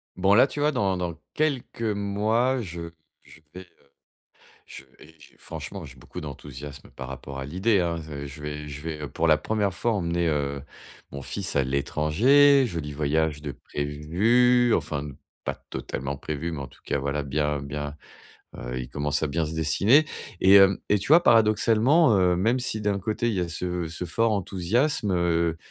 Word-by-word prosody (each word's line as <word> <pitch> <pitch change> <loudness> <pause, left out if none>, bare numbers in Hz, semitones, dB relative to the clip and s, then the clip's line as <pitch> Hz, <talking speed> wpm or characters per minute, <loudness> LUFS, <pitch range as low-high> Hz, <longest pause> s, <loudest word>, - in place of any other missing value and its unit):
Bon, 95 +2 +3
là 125 +6 +6
tu 145 - -6
vois 150 +1 +3
dans 100 -8 0
dans 85 -2 -3 0.2
quelques 145 -6 -1
mois, 110 +5 0
je 85 -4 -6 0.3
je 80 - -18
vais 90 - -8
heu, - - -14 1.0
je - - -10 0.2
vais 75 - -15
et 80 - -19 0.2
franchement - - -7
j'ai - - -12
beaucoup - - -9
d'enthousiasme 70 0 -9
par 65 - -8
rapport 65 +1 -8
à 65 - -4
l'idée, 95 +7 +1
hein, 85 -1 0
z 75 -2 -7
je 70 +2 -11
vais 75 0 -5
je 75 0 -8
vais, 80 -1 -5
heu, 75 - -4
pour 85 - 0
la 80 -1 +5
1re 105 -1 -1
fois 115 +6 0
emmener, 85 -3 0
heu, 70 -2 -1 0.5
mon 70 0 -7
fils - - -3
à 70 - +3
l'étranger. 85 - +4
Joli 80 -7 -5
voyage 75 +1 0
de 75 -1 -5
prévu 110 +13 +2
enfin 75 -2 -2
de 70 -2 -8 0.3
pas - - -3 0.2
totalement 70 +2 -4
prévu, 75 +4 -4
mais 80 - -5
en 70 - -6
tout - - -21
cas, 70 - -1
voilà, 70 +2 -2
bien 75 +1 -1
bien 75 +1 -5 0.6
heu, 60 +1 -5
il 65 - -5
commence 75 +2 -1
à - - +1
bien 80 +3 -1
se 75 - -5
dessiner. 100 - +3 0.3
Et 95 - +5
hem, 95 -1 +7
et 105 - +3
tu 95 - -5
vois 165 +4 +7
paradoxalement, 115 - +4
heu, 90 -2 +3
même 115 +8 +2
si 120 -3 -2
d'un 105 -2 0
côté 110 +3 -2
il 115 - 0
y 95 - 0
a 85 - -2
ce 90 0 -3
ce 85 +2 -5
fort 115 +7 +1
enthousiasme, 105 - 0
heu 85 -2 +1
85 Hz, 190 wpm, -25 LUFS, 75-105 Hz, 1.0 s, hem